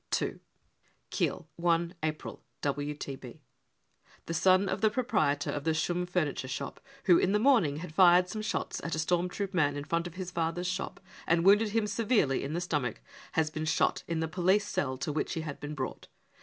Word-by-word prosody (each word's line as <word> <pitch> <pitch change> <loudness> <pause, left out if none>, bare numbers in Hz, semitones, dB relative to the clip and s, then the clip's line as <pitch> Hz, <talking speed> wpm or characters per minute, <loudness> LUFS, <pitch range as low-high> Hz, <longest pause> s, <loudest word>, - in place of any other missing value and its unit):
II - - -3 0.4
" - - -40
Kiel, - - -1 0.2
i 170 0 +2
April 155 0 -4 0.2
(WTB.): 145 -2 -4 0.9
The 165 - -4
son 185 +3 +4
of - - -2
the 220 - +5
proprietor 155 - 0
of 145 - -3
the 160 0 +1
Schumm 175 +2 0
furniture 155 -7 -1
shop, 130 - -5 0.2
who 175 -3 +6
in 190 - +2
the - - +4
morning 220 - +4
had 160 0 -7
fired 180 0 +6
some 215 +3 -4
shots 215 - -3
at 165 - -2
a - - -4
storm 175 +3 +1
troop 200 +1 -4
man 145 -5 +2
in 145 - -4
front 170 +3 -1
of 175 - -11
his 180 -1 -5
father's 170 +1 -1
shop 185 +1 -3 0.3
and 165 +1 +3
wounded 210 +3 +6
him 220 +1 +1
severely 210 - +1
in 140 +2 -3
the 175 - -1
stomach, 145 -9 -1 0.3
has 155 -1 +1
been 155 0 -3
shot 155 - +1
in 165 -1 -1
the 160 - 0
police 185 +5 +2
cell 130 -2 -1
to 145 +3 -3
which 155 - -1
he 165 - -2
had 155 -3 -6
been 150 +1 -6
brought. 130 -2 -5
170 Hz, 200 wpm, -30 LUFS, 150-185 Hz, 0.9 s, who